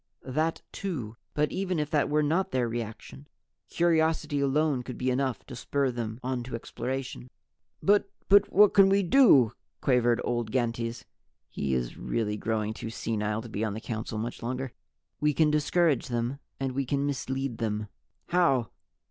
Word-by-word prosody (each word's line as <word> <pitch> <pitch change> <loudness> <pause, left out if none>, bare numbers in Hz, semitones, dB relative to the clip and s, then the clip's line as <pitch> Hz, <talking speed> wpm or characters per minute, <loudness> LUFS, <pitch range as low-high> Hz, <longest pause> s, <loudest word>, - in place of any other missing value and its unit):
"That 155 +5 -1
too. 130 - -4 0.2
But 150 0 +1
even 185 -2 -1
if 150 0 -2
that 150 -3 +2
were 150 +1 +2
not 175 +6 +1
their 125 -6 0
reaction, 115 +4 -6 0.4
curiosity 160 -3 +2
alone 140 0 +2
could 125 -1 -7
be 130 0 0
enough 130 -1 -1
to 125 - -9
spur 135 +2 0
them 115 -1 -4
on 130 -1 -1
to 125 - -5
exploration." 125 +2 -5 0.5
"But 200 0 +4 0.2
but 200 +1 +5
what 205 +1 +6
can 195 -1 +7
we 200 +1 +3
do?" 170 - +6 0.3
quavered 120 -3 +3
old 120 -2 -1
Gantes. 115 -1 -1 0.5
He 70 -2 -1
is - - -3
really 105 - -1
growing 110 0 -1
too 110 - -6
senile 110 -1 -2
to 120 - -9
be 110 0 -3
on 105 -2 -1
the - - -4
Council 110 -1 -4
much 115 +3 -4
longer. 125 +2 -3 0.5
"We 150 +1 +2
can 155 -2 +4
discourage 150 -1 +2
them. 120 +3 -2 0.2
And 135 -1 -1
we 135 +2 -1
can 140 +2 -1
mislead 135 -3 -3
them." 105 -2 -1 0.4
"How?" 135 - +2
130 Hz, 165 wpm, -28 LUFS, 115-150 Hz, 0.5 s, can